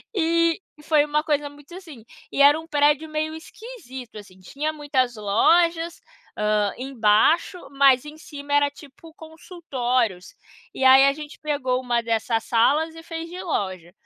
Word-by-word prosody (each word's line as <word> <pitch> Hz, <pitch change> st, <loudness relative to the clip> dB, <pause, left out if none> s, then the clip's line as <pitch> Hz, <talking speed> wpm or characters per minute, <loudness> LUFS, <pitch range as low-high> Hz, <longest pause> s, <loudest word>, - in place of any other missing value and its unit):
e 335 Hz, 0 st, +1 dB, 0.2 s
e -, -, -16 dB
foi 300 Hz, -1 st, +3 dB
uma 300 Hz, 0 st, -1 dB
coisa 295 Hz, -2 st, -1 dB
muito 290 Hz, +3 st, -17 dB
assim. 315 Hz, -, -12 dB, 0.3 s
E -, -, 0 dB
era 290 Hz, +2 st, +6 dB
um 325 Hz, -, -12 dB
prédio 295 Hz, 0 st, +1 dB
meio 310 Hz, 0 st, -3 dB
esquisito 320 Hz, -, -11 dB
assim, 190 Hz, -3 st, -13 dB
tinha 285 Hz, -, -4 dB
muitas 265 Hz, -5 st, -1 dB
lojas, 330 Hz, +11 st, +1 dB, 0.4 s
hã, 210 Hz, -1 st, +1 dB
embaixo, 255 Hz, -, +2 dB
mas 275 Hz, -1 st, +4 dB
em 300 Hz, +1 st, -10 dB
cima 285 Hz, -2 st, -8 dB
era 290 Hz, 0 st, +3 dB
tipo, 290 Hz, +3 st, -16 dB
consultórios. 255 Hz, -, -3 dB, 0.4 s
E -, -, -3 dB
aí 265 Hz, +1 st, +8 dB
a 275 Hz, -, +3 dB
gente 300 Hz, +1 st, -10 dB
pegou 260 Hz, -4 st, -1 dB
uma 240 Hz, -2 st, -1 dB
dessas 225 Hz, 0 st, -1 dB
salas 295 Hz, +8 st, +2 dB
e 325 Hz, -, -10 dB
fez 330 Hz, 0 st, -7 dB
de 360 Hz, +2 st, -8 dB
loja. 185 Hz, -, -4 dB
290 Hz, 160 wpm, -23 LUFS, 245-320 Hz, 0.4 s, aí